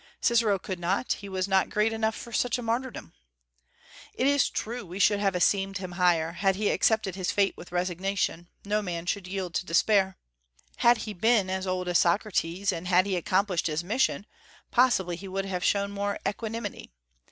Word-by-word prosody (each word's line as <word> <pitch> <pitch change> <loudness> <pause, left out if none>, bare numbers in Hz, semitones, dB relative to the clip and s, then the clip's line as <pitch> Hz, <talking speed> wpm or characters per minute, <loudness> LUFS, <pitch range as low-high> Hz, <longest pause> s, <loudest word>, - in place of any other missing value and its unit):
Cicero 230 -4 +3
could 185 0 -6
not: 185 +8 -1
he 200 - -9
was 190 0 -2
not 190 -1 +2
great 215 +1 +1
enough 220 0 0
for 235 - -9
such 245 +2 +1
a 245 - -6
martyrdom. 230 - -3 1.0
It 255 - 0
is 285 -1 +3
true 235 +2 -4
we 180 0 -8
should 205 0 +3
have 195 -2 +1
esteemed 195 +1 +1
him 185 -1 -6
higher, 175 -2 +2
had 190 +2 +1
he 205 +1 +1
accepted 220 -4 +2
his 185 -1 -2
fate 200 -1 +1
with 175 - -12
resignation: 180 -1 -1 0.2
no 210 +1 0
man 175 -4 -4
should 185 +1 -2
yield 185 -2 -4
to 180 - -1
despair. 190 +2 +2 0.6
Had 235 0 +5
he 215 - -5
been 205 -1 +2
as 190 0 -2
old 185 -1 -2
as 175 -1 +3
Socrates, 180 0 +1
and 170 +2 -5
had 185 0 +4
he 195 -2 -1
accomplished 185 0 +1
his 155 +1 -2
mission, 210 +1 0 0.5
possibly 240 -9 +3
he 195 +3 -9
would 195 +1 -3
have 185 -2 -3
shown 200 0 +1
more 200 0 -2
equanimity. 215 +1 -5
195 Hz, 185 wpm, -27 LUFS, 180-210 Hz, 1.0 s, Had